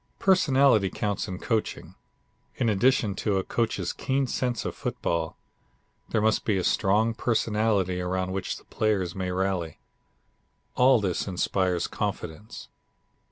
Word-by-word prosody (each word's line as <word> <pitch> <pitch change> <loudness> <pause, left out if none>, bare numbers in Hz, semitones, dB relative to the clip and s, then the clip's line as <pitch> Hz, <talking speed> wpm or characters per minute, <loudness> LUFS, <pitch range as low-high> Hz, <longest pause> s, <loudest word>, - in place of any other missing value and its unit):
Personality 135 - +4
counts 100 +2 -2
in 95 -2 -5
coaching. 110 +2 -2 0.6
In 120 -3 +1
addition 110 0 +2
to 100 -3 0
a 95 - 0
coach's 110 -6 -1
keen 135 0 0
sense 125 -2 -2
of - - -2
football, 80 -1 -2 0.7
there 110 - +1
must 110 0 +2
be 105 -3 +1
a 90 - -1
strong 105 +6 +2
personality 105 -5 0
around 95 +1 -2
which 95 0 -3
the - - -17
players 100 -5 0
may 95 -1 -3
rally. 90 -3 -1 1.0
All 125 -1 +5
this 95 -3 -1
inspires 90 -1 0
confidence. 80 +7 -5
100 Hz, 130 wpm, -26 LUFS, 95-115 Hz, 1.0 s, All